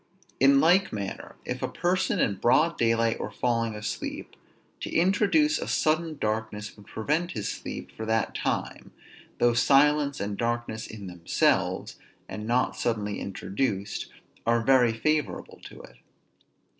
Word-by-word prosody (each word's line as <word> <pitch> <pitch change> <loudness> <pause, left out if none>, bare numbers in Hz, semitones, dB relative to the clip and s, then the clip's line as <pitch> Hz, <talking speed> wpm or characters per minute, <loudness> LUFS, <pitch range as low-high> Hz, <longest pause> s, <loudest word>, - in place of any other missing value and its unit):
In 135 +1 +6
like 180 +6 +4
manner, 100 -2 -6
if - - -4
a - - 0
person 185 +2 0
in 100 -3 +1
broad 150 - +3
daylight 115 0 +1
were - - -3
falling 115 +1 -1
asleep, 105 0 -5 0.4
to - - -5
introduce 210 - +3
a - - -4
sudden 155 0 +1
darkness 105 -2 -3
would 105 -2 -17
prevent 155 +10 -1
his 105 - -3
sleep - - -7
for 110 - -6
that 110 0 0
time, - - -3 0.4
though 120 0 +3
silence 140 +3 +4
and 100 0 -3
darkness 120 -2 -2
in 105 -2 -9
themselves, 90 -2 0 0.3
and 105 0 -6
not 125 +2 +1
suddenly 105 -3 -2
introduced, 100 +1 -3 0.4
are 115 0 +2
very 125 -1 +5
favorable 150 +5 -1
to - - -11
it. - - -15
115 Hz, 140 wpm, -27 LUFS, 105-150 Hz, 0.4 s, In